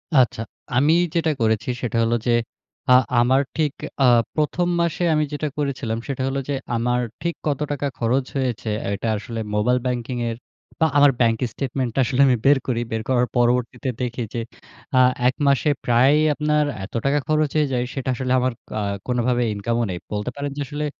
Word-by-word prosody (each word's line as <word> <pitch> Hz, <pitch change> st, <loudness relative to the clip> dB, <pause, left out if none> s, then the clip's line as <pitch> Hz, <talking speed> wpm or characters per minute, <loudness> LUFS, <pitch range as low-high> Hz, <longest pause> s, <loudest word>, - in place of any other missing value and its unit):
আচ্ছা, 125 Hz, -4 st, +3 dB, 0.4 s
আমি 145 Hz, +5 st, +4 dB, 0.2 s
যেটা 165 Hz, -1 st, +2 dB
করেছি 110 Hz, 0 st, +1 dB
সেটা 120 Hz, -2 st, -2 dB
হলো 115 Hz, +1 st, +2 dB
যে 120 Hz, -, +4 dB, 0.6 s
আ -, -, +8 dB, 0.3 s
আমার 130 Hz, +3 st, +3 dB, 0.2 s
ঠিক 150 Hz, -3 st, +1 dB, 0.3 s
আ -, -, +6 dB, 0.3 s
১ম 160 Hz, +3 st, 0 dB
মাসে 170 Hz, +1 st, -1 dB
আমি 155 Hz, 0 st, +2 dB
যেটা 150 Hz, +1 st, -2 dB
করেছিলাম 135 Hz, -6 st, -2 dB
সেটা 135 Hz, -2 st, -3 dB
হলো 135 Hz, +1 st, -1 dB
যে -, -, +1 dB, 0.2 s
আমার 120 Hz, +1 st, +1 dB, 0.2 s
ঠিক 170 Hz, +1 st, -2 dB
কত 145 Hz, -3 st, 0 dB
টাকা 145 Hz, 0 st, -1 dB
খরচ 125 Hz, +3 st, +1 dB
হয়েছে 125 Hz, -4 st, -2 dB, 0.2 s
এটা 100 Hz, -, -3 dB
আসলে 115 Hz, +2 st, -6 dB, 0.2 s
মোবাইল 125 Hz, +4 st, +2 dB
ব্যাংকিং 125 Hz, 0 st, -2 dB
এর 115 Hz, -, -4 dB, 0.4 s
বা 160 Hz, -, +4 dB
আমার 145 Hz, -1 st, +7 dB
ব্যাংক 115 Hz, -1 st, +3 dB, 0.2 s
স্টেটমেন্টটা 130 Hz, -2 st, -2 dB
আসলে 130 Hz, +1 st, +1 dB
আমি 125 Hz, -, +4 dB
বের 140 Hz, +1 st, +6 dB
করি। 120 Hz, -2 st, 0 dB
বের 110 Hz, 0 st, -1 dB
করার 125 Hz, -1 st, +2 dB
পরবর্তীতে 120 Hz, +2 st, +1 dB
দেখি 125 Hz, 0 st, -2 dB
যে 120 Hz, -, -2 dB, 0.6 s
আ -, -, +7 dB, 0.3 s
১ 130 Hz, -, +2 dB
মাসে 140 Hz, +2 st, +3 dB, 0.2 s
প্রায় 125 Hz, +4 st, +4 dB, 0.2 s
আপনার 150 Hz, 0 st, +1 dB, 0.2 s
এত 95 Hz, -, -9 dB
টাকা 140 Hz, +1 st, +3 dB
খরচ 155 Hz, -1 st, +2 dB
হয়ে 150 Hz, -1 st, +3 dB
যায় 125 Hz, -1 st, +1 dB
সেটা 135 Hz, -1 st, -3 dB
আসলে 130 Hz, +1 st, -3 dB
আমার 130 Hz, 0 st, 0 dB, 0.2 s
কা 110 Hz, -, -3 dB, 0.3 s
কোন 125 Hz, -1 st, 0 dB
ভাবে 125 Hz, -1 st, +2 dB
ইনকামও 115 Hz, +3 st, -1 dB
নেই। 90 Hz, -, -3 dB, 0.2 s
বলতে 105 Hz, +3 st, -2 dB
পারেন 145 Hz, 0 st, -4 dB
যে -, -, -2 dB
আসলে 150 Hz, +1 st, -3 dB
130 Hz, 185 wpm, -22 LUFS, 120-145 Hz, 0.6 s, আ